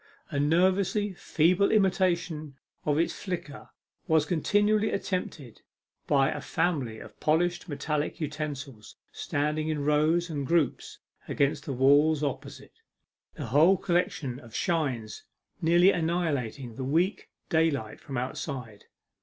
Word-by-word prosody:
A 140 - -1
nervously 185 +6 +2
feeble 180 +3 +2
imitation 175 -7 +1 0.3
of 145 -1 +2
its 165 - +1
flicker 170 -6 -6 0.4
was 160 -2 +3
continually 205 +6 +2
attempted 170 - -4 0.5
by 135 -1 +3
a - - -4
family 135 -11 -1
of - - -13
polished 175 +3 +1
metallic 150 +1 -2
utensils 145 -6 -5 0.2
standing 150 +2 -2
in 150 -2 -2
rows 155 +4 +2
and 145 -5 -4
groups 165 -2 0 0.3
against 140 +3 0
the 140 - -2
walls 145 +4 +4
opposite, 140 0 -5 0.6
the 145 - -5
whole 155 - +5
collection 160 -8 -1
of 115 -5 -13
shines 135 -10 -1 0.4
nearly 175 +3 +5
annihilating 145 - -2
the 130 - -4
weak 165 +9 0 0.2
daylight 160 -9 0
from 135 - -6
outside. 125 -3 -5
155 Hz, 120 wpm, -28 LUFS, 140-175 Hz, 0.6 s, whole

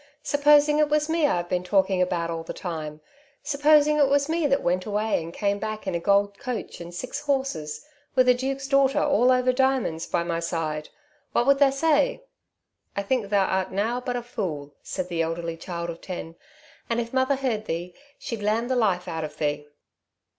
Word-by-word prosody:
Supposing 295 +1 +4
it 300 -1 +3
was 300 +1 +1
me 325 -2 +3
I've 175 -8 -1
been 180 0 -1
talking 190 0 +2
about 170 -2 0
all 165 0 -3
the 165 - -7
time? 155 -4 -5 0.4
Supposing 295 +1 +4
it 285 - +5
was 285 0 +2
me 325 -1 +1
that 275 0 +1
went 185 +2 0
away 210 -2 0
and 165 +1 -7
came 200 +2 -1
back 215 0 -4
in 190 - -2
a 170 - 0
gold 200 +2 +2
coach 250 -8 -5
and 170 0 -8
six 255 +10 -5
horses, 265 - -2 0.3
with 255 -1 +4
a 250 - +7
duke's 270 +2 -3
daughter 275 -1 +3
all 255 -3 +3
over 255 0 +3
diamonds 260 -11 0
by 170 - 0
my 170 -1 -2
side, 160 -3 -3 0.4
what 240 - +2
would 275 0 +4
tha 280 -1 +5
say?" 320 - +1 0.7
"I 200 - 0
think 215 -1 -1
tha 205 - 0
art 190 -1 +1
nowt 230 +6 -1
but 245 - -1
a 245 - -3
fool," 160 - -5
said 185 -2 -4
the 170 -2 -1
elderly 165 0 -2
child 170 0 -5
of 165 - -11
ten, 170 -3 -7 0.5
"and, 230 0 +1
if 235 +1 -4
mother 260 +1 +2
heard 245 -5 -2
thee, 175 +1 -4 0.2
she'd 230 -3 -5
lamm 220 +4 0
the 260 - +1
life 195 -7 +1
out 160 -2 -3
of 150 0 -7
thee." 150 -1 -2
215 Hz, 200 wpm, -25 LUFS, 170-270 Hz, 0.7 s, a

